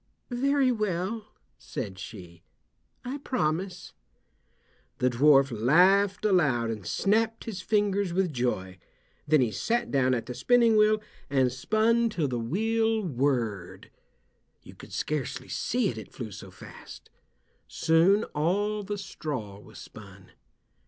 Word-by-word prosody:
"Very 270 +1 +2
well," 210 0 -2 0.3
said 105 -7 -6
she, 90 -6 -10 0.6
"I 265 +4 -4
promise." 185 - -2 1.0
The 125 0 +1
dwarf 135 +2 +5
laughed 185 - +3
aloud 140 - +2
and 105 -5 -6
snapped 225 +2 +1
his 205 -5 -6
fingers 200 -2 +1
with 180 -2 0
joy. 95 -7 -2 0.5
Then 150 -1 +4
he 120 -3 +1
sat 235 - -1
down 130 -2 +2
at 115 - -4
the 125 - -6
spinning 235 - +3
wheel 215 0 +3 0.3
and 130 -2 +2
spun 220 - +1
till 165 -8 -1
the 125 -2 -2
wheel 220 - 0
whirred. 120 - -2 0.7
You - - -13
could - - -14
scarcely 150 -4 -3
see 245 -3 0
it, 115 - -5
it 110 - -11
flew 115 -5 -7
so 100 -1 -10
fast. 95 - -13 0.6
Soon 170 +6 +3
all 205 +7 0
the 205 +1 -4
straw 130 - -6
was - - -15
spun. - - -13
170 Hz, 130 wpm, -27 LUFS, -, 1.0 s, dwarf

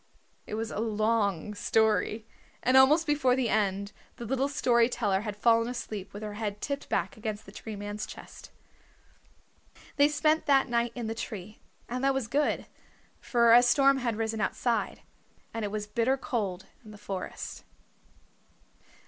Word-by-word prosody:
It - - -4
was 225 +1 -3
a - - -4
long 215 -4 0
story. 220 +1 +1 0.4
And 255 - +3
almost 290 +5 +6
before 290 -4 +2
the 255 -3 0
end 200 -1 0 0.2
the 240 - -7
little 265 +3 0
story 240 -4 +3
teller 205 -6 0
had 210 -1 -5
fallen 230 +2 +3
asleep 215 -5 -5
with 205 +2 -8
her 210 -1 -5
head 210 -1 -4
tipped 280 +3 -4
back - - -1
against 215 -1 -5
the 195 - -12
Tree 215 +1 -7
Man's 205 +1 -5
chest. - - -11 1.5
They 285 0 +6
spent 305 +1 +1
that 275 -2 +4
night 235 0 0
in 240 -2 -4
the 220 - -2
tree, 215 -2 -7 0.3
and 250 +2 -4
that 275 0 +3
was 265 -4 -1
good, 290 +5 0 0.5
for 235 -2 +4
a 240 - +9
storm 275 +3 +4
had 240 -4 -1
risen 220 0 -2
outside, 235 +2 -1 0.5
and 225 -1 -3
it 205 - -1
was 210 0 -3
bitter 235 +5 +1
cold 200 -8 -3 0.2
in 215 - -13
the 210 - -11
forest. 195 -2 -6
230 Hz, 165 wpm, -29 LUFS, 210-255 Hz, 1.5 s, a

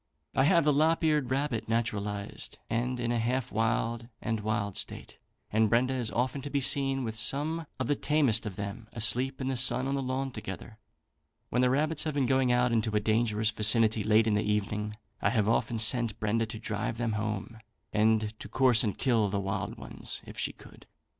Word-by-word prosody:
"I 135 - +3
have 170 +1 +4
the 150 0 +3
lop 160 +4 +2
eared 150 -5 +2
rabbit 130 -5 -1
naturalised, 105 -3 -3
and 125 +2 -1
in 120 -1 -1
a 120 - 0
half 125 +2 -1
wild 115 +1 -1
and 110 0 -2
wild 105 -2 -2
state, - - -5 0.3
and 110 0 +3
Brenda 125 +3 +2
is 125 -4 -1
often 130 +4 -1
to 145 - -6
be 140 0 0
seen 135 0 +2
with 110 -2 -3
some 145 +8 -1
of 130 - -1
the 145 - +1
tamest 135 -8 +1
of 100 - -6
them 100 +3 -6
asleep 120 +4 +2
in 130 - -3
the 135 - -1
sun 130 +1 +3
on 135 - -1
the 140 - -1
lawn 130 +1 -2
together. 110 0 -8 0.7
When 125 - +1
the 125 - +4
rabbits 150 +4 +1
have 155 -2 -2
been 140 -2 +2
going 130 -1 +2
out 125 0 +2
into 110 -2 0
a - - +4
dangerous 110 0 +1
vicinity, 110 0 +2
late 110 +1 +4
in 110 - +1
the 105 - +2
evening, 105 0 -2 0.2
I - - +3
have 110 -3 +1
often 115 +1 +1
sent 110 0 +3
Brenda 110 +1 0
to 110 - -7
drive 110 0 -3
them 120 -1 -1
home, 105 +1 -4 0.3
and 110 0 +2
to - - -9
course 130 -3 +4
and 105 -4 -2
kill 115 -6 +2
the 100 +1 -1
wild 100 0 -3
ones - - -4
if - - -10
she - - -1
could. - - -17
115 Hz, 205 wpm, -29 LUFS, 110-130 Hz, 0.7 s, have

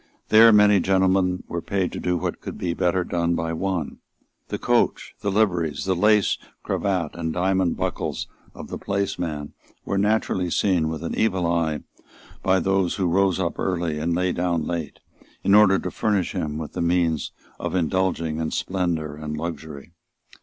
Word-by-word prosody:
There 115 +1 +8
many 105 -1 +6
gentlemen 95 -1 +2
were 85 - -4
paid 95 -1 -1
to - - -5
do 90 -1 0
what - - -4
would - - -6
be 85 -2 -2
better 90 +1 +1
done 85 -1 0
by 80 0 -2
one. 90 -2 -3 0.5
The - - -3
coach, - - +1
the 100 - -2
liveries, 90 -8 +1
the 95 -1 +1
lace 105 +2 +3 0.2
cravat 90 -6 -1
and 80 -1 -3
diamond 95 0 +1
buckles - - -2 0.3
of - - -9
the - - -5
placeman 90 -7 -3 0.3
were 100 - 0
naturally 100 -3 +1
seen 85 -3 +1
with 80 0 -5
an 85 - -3
evil 95 -5 +1
eye 85 -2 0 0.6
by 95 0 +3
those 95 0 +1
who 95 - -1
rose 95 +1 +2
up 85 -2 -2
early 85 -4 -1
and 85 +2 0
lay 90 +1 +1
down 85 -2 0
late 85 -4 -4 0.5
in 100 - +3
order 100 -2 +7
to - - -4
furnish 105 -5 0
him 75 -1 -3
with 75 -2 -6
the - - -3
means 85 -3 +1 0.3
of - - -3
indulging 85 -2 0
in 80 -1 -1
splendour 85 -5 -2
and 75 0 -5
luxury. 80 -3 -6
90 Hz, 170 wpm, -24 LUFS, 80-95 Hz, 0.6 s, There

